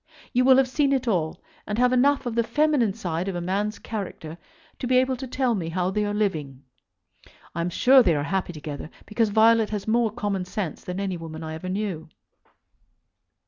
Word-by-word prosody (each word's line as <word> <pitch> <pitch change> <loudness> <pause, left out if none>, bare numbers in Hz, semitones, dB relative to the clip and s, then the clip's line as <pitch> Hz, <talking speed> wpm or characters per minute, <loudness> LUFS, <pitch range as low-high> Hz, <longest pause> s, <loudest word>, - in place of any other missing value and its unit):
You 250 0 +3
will 260 0 +7
have 265 -1 +4
seen 275 +2 +1
it 260 -2 -1
all, 170 -4 -1 0.2
and 210 - -2
have 250 +1 +3
enough 275 +2 +3
of 240 - -2
the 235 0 +2
feminine 245 -3 +1
side 175 -4 -3
of 195 - -3
a - - -2
man's 200 +5 -2
character 175 -6 -6 0.4
to 250 - -3
be 255 0 +3
able 260 +1 +2
to 260 +1 -7
tell 255 -1 0
me 175 -6 -3
how 180 +2 -1
they 210 +2 0
are 205 - -1
living. 155 -11 -2 0.9
I 170 - -2
am 170 - -1
sure 260 +9 +6
they 175 -9 +3
are 145 - -1
happy 180 +5 -2
together, 150 -2 -7 0.2
because 220 0 0
Violet 220 +1 +4
has 210 -1 -4
more 230 +1 +2
common 205 -4 -2
sense 180 -3 -4
than 180 +1 -5
any 195 -3 -2
woman 160 -1 -8
I 160 0 -5
ever 160 +3 -6
knew. 185 -5 -3
205 Hz, 205 wpm, -25 LUFS, 175-240 Hz, 0.9 s, will